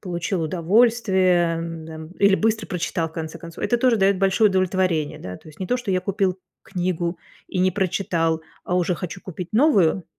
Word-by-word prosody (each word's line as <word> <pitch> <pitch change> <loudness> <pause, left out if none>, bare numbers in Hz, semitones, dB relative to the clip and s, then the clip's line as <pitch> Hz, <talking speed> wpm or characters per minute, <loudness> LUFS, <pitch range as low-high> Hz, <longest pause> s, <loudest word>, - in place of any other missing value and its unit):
получил 175 -1 -2
удовольствие, 185 -1 +3
эм, 165 -1 -6
д 160 - -9
эм, 160 0 -8
или 200 -1 +5
быстро 220 0 0
прочитал, 170 -2 -2
в - - -20
конце 160 0 -6
концов. 170 -1 -7
Это 240 - +2
тоже 240 -1 +3
дает 195 -1 +3
большое 195 +3 +4
удовлетворение, 185 -4 0
да, 90 0 -7
то - - -16
есть 155 - -16
не 185 - -2
то, 250 - +1
что 245 -5 -4
я 185 -1 +2
купил 190 0 -1 0.2
книгу 175 -2 -2 0.3
и 185 - -3
не 185 +1 +3
прочитал, 170 -4 0 0.2
а 180 - 0
уже 180 0 +1
хочу 180 +2 -6
купить 180 -1 -7
новую. 205 - +3
185 Hz, 195 wpm, -23 LUFS, 165-195 Hz, 0.3 s, или